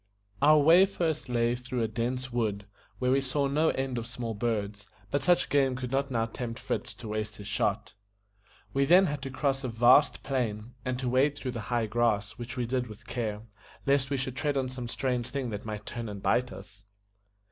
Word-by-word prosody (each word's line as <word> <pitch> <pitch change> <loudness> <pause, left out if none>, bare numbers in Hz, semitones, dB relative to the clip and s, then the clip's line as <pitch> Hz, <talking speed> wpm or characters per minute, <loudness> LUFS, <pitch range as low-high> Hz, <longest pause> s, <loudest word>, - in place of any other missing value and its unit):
Our 155 +2 +7
way 165 +6 +7
first 165 -8 -2
lay 120 -1 +2
through 125 -1 -3
a - - +1
dense 125 +3 -3
wood, 105 -4 -1 0.3
where 125 0 +1
we 135 +1 +3
saw 140 +2 0
no 150 +4 +2
end 130 -2 -1
of 115 - -6
small 120 -2 -4
birds, 105 -2 -2 0.2
but 140 - +1
such 175 -1 +3
game 135 -3 +3
could 125 -1 -5
not 140 +1 0
now 115 -3 +1
tempt 115 0 -5
Fritz - - -3
to - - -9
waste 105 0 -3
his 100 - -9
shot. 105 +1 -1 0.8
We 140 0 +3
then 180 +6 +7
had 145 -4 -2
to 135 - -4
cross 135 0 -1
a - - -1
vast 120 +5 +5
plain, 120 -4 -2
and 125 -1 -2
to 130 0 -3
wade 135 +4 +3
through 130 - -3
the 115 -2 -5
high 120 -2 +1
grass, 110 -2 +1
which 120 +2 -6
we 125 - 0
did 125 +1 -1
with 105 -2 -12
care, 110 -3 -3 0.4
lest 135 -2 +2
we 140 - 0
should 130 -1 -3
tread 145 0 0
on 130 -1 0
some 125 -2 -6
strange 125 -1 -1
thing 130 -4 -3
that 105 0 -5
might 105 -1 -5
turn 115 -2 -5
and 100 -1 -6
bite 125 +1 +2
us. 100 +1 -11
125 Hz, 210 wpm, -29 LUFS, 115-135 Hz, 0.8 s, Our